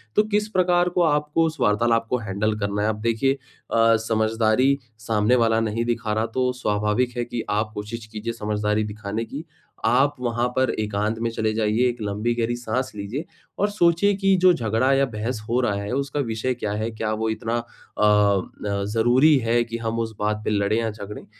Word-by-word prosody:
तो 210 Hz, -, +5 dB
किस 210 Hz, 0 st, +1 dB
प्रकार 180 Hz, -2 st, +2 dB
को 180 Hz, -, +3 dB
आपको 150 Hz, +1 st, +2 dB
उस 160 Hz, -, -5 dB
वार्तालाप 115 Hz, +1 st, +2 dB
को 125 Hz, -, +1 dB
हैंडल 105 Hz, 0 st, -1 dB
करना 100 Hz, 0 st, -1 dB
है। 105 Hz, -, +2 dB
अब 105 Hz, -1 st, -3 dB
देखिए 115 Hz, +4 st, +1 dB
अ, 115 Hz, -4 st, 0 dB
समझदारी 110 Hz, +4 st, +2 dB, 0.2 s
सामने 110 Hz, +2 st, +2 dB
वाला 115 Hz, -2 st, +3 dB
नहीं 115 Hz, +1 st, -1 dB
दिखा 115 Hz, -2 st, -1 dB
रहा 110 Hz, +1 st, 0 dB
तो 125 Hz, -1 st, +2 dB
स्वाभाविक 105 Hz, +4 st, 0 dB
है 120 Hz, -, -1 dB
कि 120 Hz, -1 st, -4 dB
आप 105 Hz, +1 st, 0 dB
कोशिश 110 Hz, +2 st, -6 dB
कीजिये 110 Hz, +2 st, -5 dB
समझदारी 105 Hz, -1 st, -1 dB
दिखाने 105 Hz, +1 st, -4 dB
की, 145 Hz, +7 st, -7 dB, 0.4 s
आप 135 Hz, +5 st, +3 dB
वहाँ 120 Hz, 0 st, 0 dB
पर 130 Hz, 0 st, +3 dB
एकांत 105 Hz, +1 st, -1 dB
में 115 Hz, 0 st, 0 dB
चले 110 Hz, -1 st, -1 dB
जाइए, 110 Hz, +3 st, +2 dB
1 120 Hz, -, -4 dB
लम्बी 105 Hz, +3 st, -1 dB
गहरी 120 Hz, 0 st, 0 dB
साँस 125 Hz, +2 st, -2 dB
लीजिए 105 Hz, +10 st, -4 dB, 0.3 s
और 205 Hz, -, +2 dB
सोचिए 200 Hz, 0 st, +3 dB
कि 195 Hz, 0 st, +3 dB
जो 185 Hz, -1 st, +7 dB
झगड़ा 115 Hz, 0 st, +1 dB
या 135 Hz, 0 st, +3 dB
बहस 115 Hz, -1 st, -4 dB
हो 120 Hz, +2 st, +2 dB
रहा 105 Hz, -4 st, +1 dB
है, 100 Hz, -, -5 dB
उसका 140 Hz, +1 st, -2 dB
विषय 120 Hz, -1 st, -1 dB
क्या 105 Hz, -4 st, -3 dB
है? 110 Hz, +2 st, -2 dB
क्या 110 Hz, -1 st, -3 dB
वो 110 Hz, +1 st, -1 dB
इतना 115 Hz, +1 st, -2 dB
अ 120 Hz, -2 st, -6 dB
अ, 100 Hz, -1 st, +2 dB
ज़रूरी 125 Hz, +7 st, +4 dB
है 120 Hz, 0 st, +2 dB
कि 115 Hz, 0 st, -5 dB
हम 115 Hz, 0 st, -3 dB
उस 115 Hz, -1 st, -3 dB
बात 105 Hz, 0 st, -1 dB
पर -, -, 0 dB
लड़ें 100 Hz, +1 st, +1 dB
या 115 Hz, -1 st, 0 dB
झगड़ें? 105 Hz, -1 st, -9 dB
115 Hz, 200 wpm, -23 LUFS, 105-125 Hz, 0.4 s, जो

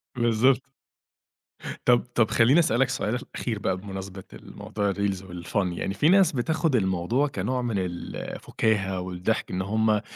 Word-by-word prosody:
بالضبط. 125 Hz, +3 st, +2 dB, 1.2 s
طَب 120 Hz, -1 st, +5 dB
طَب، 110 Hz, -3 st, +3 dB
خلِّيني 125 Hz, +8 st, +5 dB
أسألك 135 Hz, -4 st, +2 dB
سؤال 125 Hz, -3 st, -1 dB, 0.2 s
أخير 115 Hz, -4 st, -3 dB
بقى، 95 Hz, -, -1 dB
بمناسبة 95 Hz, 0 st, -7 dB
ال -, -, -13 dB
موضوع 100 Hz, -2 st, -2 dB
الReels 100 Hz, -1 st, -1 dB
والFun 90 Hz, 0 st, -3 dB
يعني، 95 Hz, -, -2 dB
في 145 Hz, +11 st, +3 dB
ناس 190 Hz, -2 st, +5 dB
بتاخد 155 Hz, +3 st, 0 dB
الموضوع 95 Hz, +6 st, +1 dB
كنوع 130 Hz, -2 st, -2 dB
من 120 Hz, -4 st, -1 dB
ال 90 Hz, -2 st, -5 dB
الفُكاهة 95 Hz, -4 st, -1 dB
والضحك، 90 Hz, +4 st, -2 dB
إن 90 Hz, -, -1 dB
هُم 110 Hz, +2 st, +1 dB
110 Hz, 150 wpm, -26 LUFS, 95-125 Hz, 1.2 s, طَب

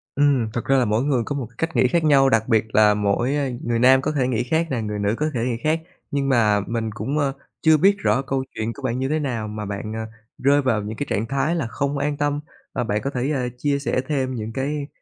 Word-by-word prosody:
Ừm, 140 Hz, -6 st, +3 dB
thực 120 Hz, -, -3 dB
ra 135 Hz, -, +3 dB
là 125 Hz, -, +3 dB
mỗi 110 Hz, +4 st, +1 dB
người 135 Hz, -5 st, +1 dB
có 145 Hz, -, -3 dB
một 130 Hz, -5 st, -3 dB
cách 165 Hz, 0 st, -2 dB
nghĩ 125 Hz, -, +4 dB
khác 170 Hz, +4 st, +1 dB
nhau, 140 Hz, -3 st, +5 dB
đặc 115 Hz, -3 st, +2 dB
biệt 110 Hz, -3 st, +3 dB
là 105 Hz, 0 st, +6 dB
mỗi, 105 Hz, +6 st, 0 dB
a, 140 Hz, -2 st, 0 dB
người 120 Hz, -1 st, 0 dB
nam 130 Hz, +2 st, +6 dB
có 150 Hz, -, -1 dB
thể 135 Hz, -4 st, 0 dB
nghĩ 125 Hz, -2 st, 0 dB
khác 160 Hz, +6 st, 0 dB
nè, 120 Hz, -3 st, -1 dB
người 105 Hz, -1 st, -3 dB
nữ 105 Hz, +2 st, +1 dB
có 155 Hz, +1 st, 0 dB
thể 125 Hz, -, -1 dB
nghĩ 120 Hz, -2 st, -1 dB
khác, 160 Hz, +1 st, +1 dB, 0.3 s
nhưng 140 Hz, -1 st, 0 dB
mà 110 Hz, -5 st, +3 dB
mình 115 Hz, -1 st, -2 dB
cũng, 140 Hz, +6 st, -2 dB
a, 140 Hz, -2 st, +1 dB, 0.3 s
chưa 160 Hz, -1 st, +5 dB
biết 195 Hz, +6 st, +4 dB
rõ 135 Hz, -, +2 dB
câu 135 Hz, -1 st, -2 dB
chuyện 110 Hz, +1 st, -2 dB
của 140 Hz, -, -12 dB
bạn 125 Hz, 0 st, -1 dB
như 135 Hz, +1 st, -1 dB
thế 155 Hz, -, +1 dB
nào 120 Hz, -7 st, -2 dB
mà 105 Hz, 0 st, -5 dB
bạn, 100 Hz, +2 st, -5 dB
à, 110 Hz, 0 st, -3 dB, 0.3 s
rơi 140 Hz, +2 st, +3 dB
vào 115 Hz, -6 st, +1 dB
những 110 Hz, +2 st, -6 dB
cái 145 Hz, -, -2 dB
trạng 105 Hz, -, 0 dB
thái 140 Hz, +6 st, 0 dB
là 155 Hz, -8 st, -1 dB
không 140 Hz, +4 st, -2 dB
an 145 Hz, +1 st, -1 dB
tâm. 145 Hz, 0 st, 0 dB, 0.3 s
À, -, -, -1 dB
bạn 105 Hz, -2 st, -1 dB
có 140 Hz, -, -1 dB
thể, 130 Hz, +2 st, -2 dB
ơ, 125 Hz, -4 st, -1 dB
chia 140 Hz, +2 st, 0 dB
sẻ 140 Hz, -2 st, 0 dB
thêm 130 Hz, -4 st, -1 dB
những 110 Hz, -1 st, -5 dB
cái 140 Hz, +2 st, -2 dB
130 Hz, 270 wpm, -22 LUFS, 115-145 Hz, 0.3 s, là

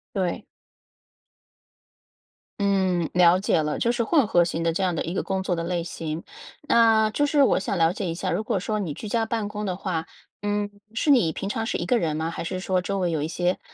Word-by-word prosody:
对。 185 Hz, -3 st, -1 dB, 2.2 s
嗯， 190 Hz, -4 st, +1 dB
了 180 Hz, 0 st, +6 dB
解 185 Hz, -4 st, +1 dB
了， 150 Hz, 0 st, -2 dB
就 235 Hz, -, +2 dB
是 240 Hz, 0 st, -1 dB
混 290 Hz, -3 st, +3 dB
合 175 Hz, -3 st, +4 dB
型 165 Hz, -1 st, -2 dB
的 165 Hz, -, +2 dB
这 180 Hz, -, -2 dB
样 180 Hz, -2 st, +1 dB
的 -, -, -1 dB
一 170 Hz, -, -4 dB
个 -, -, -1 dB
工 190 Hz, -1 st, -2 dB
作 180 Hz, -2 st, -1 dB
的 165 Hz, -, -2 dB
类 175 Hz, -1 st, -1 dB
型。 160 Hz, -1 st, -5 dB, 0.5 s
那， 225 Hz, -2 st, +5 dB
就 290 Hz, -, +1 dB
是 285 Hz, -1 st, +4 dB
我 255 Hz, -, +3 dB
想 195 Hz, -1 st, -2 dB
了 165 Hz, 0 st, +4 dB
解 195 Hz, +1 st, -4 dB
一 165 Hz, -1 st, -2 dB
下， 185 Hz, +1 st, -2 dB
如 210 Hz, +6 st, -1 dB
果 -, -, 0 dB
说 215 Hz, 0 st, -2 dB
你 170 Hz, -8 st, -3 dB
居 210 Hz, +7 st, -7 dB
家 230 Hz, 0 st, +1 dB
办 225 Hz, -3 st, -2 dB
公 210 Hz, 0 st, -4 dB
的 185 Hz, -, -2 dB
话， 175 Hz, -4 st, -3 dB, 0.4 s
嗯， 205 Hz, 0 st, -1 dB, 0.2 s
是 260 Hz, +7 st, -1 dB
你 180 Hz, -, +4 dB
平 195 Hz, -, -4 dB
常 225 Hz, +1 st, -2 dB
是 -, -, -1 dB
一 -, -, -3 dB
个 250 Hz, -, +2 dB
人 155 Hz, -4 st, -1 dB
吗？ 160 Hz, +1 st, -2 dB
还 170 Hz, -, -5 dB
是 185 Hz, +2 st, -3 dB
说 185 Hz, -1 st, 0 dB
周 195 Hz, +2 st, -2 dB
围 175 Hz, -2 st, 0 dB
有 155 Hz, -2 st, -1 dB
一 155 Hz, -, -1 dB
些 175 Hz, +2 st, -1 dB
185 Hz, 255 characters per minute, -25 LUFS, 170-210 Hz, 2.2 s, 了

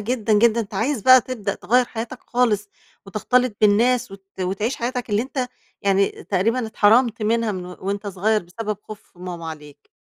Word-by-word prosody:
جدًا، 220 Hz, 0 st, -1 dB
جدًا، 230 Hz, +2 st, +4 dB
أنت 210 Hz, -1 st, -7 dB
عايز 225 Hz, +2 st, -1 dB
بقى 255 Hz, 0 st, +8 dB
تبدأ 215 Hz, -6 st, -4 dB
تغيّر 250 Hz, +2 st, +2 dB
حياتك 235 Hz, +2 st, -6 dB
خالص 220 Hz, -4 st, 0 dB, 0.4 s
وتختلط 235 Hz, +3 st, +1 dB
بالناس 225 Hz, +3 st, +3 dB
وت 195 Hz, 0 st, -12 dB, 0.2 s
وتعيش 195 Hz, +7 st, -1 dB
حياتك 245 Hz, -1 st, -3 dB
اللي 210 Hz, +2 st, +2 dB
أنت 260 Hz, -1 st, -3 dB, 0.3 s
يعني 195 Hz, 0 st, +3 dB, 0.2 s
تقريبًا 225 Hz, +5 st, 0 dB
اتحرمت 225 Hz, +1 st, +3 dB
منها 225 Hz, 0 st, +1 dB
من 180 Hz, -1 st, -6 dB
و 180 Hz, -, -9 dB
وأنت 200 Hz, +2 st, -3 dB
صغير 205 Hz, +2 st, 0 dB
بسبب 210 Hz, +4 st, -5 dB
خوف 215 Hz, 0 st, -12 dB
ماما 175 Hz, -2 st, -7 dB
عليك. 150 Hz, -2 st, -10 dB
215 Hz, 165 wpm, -22 LUFS, 195-240 Hz, 0.4 s, بقى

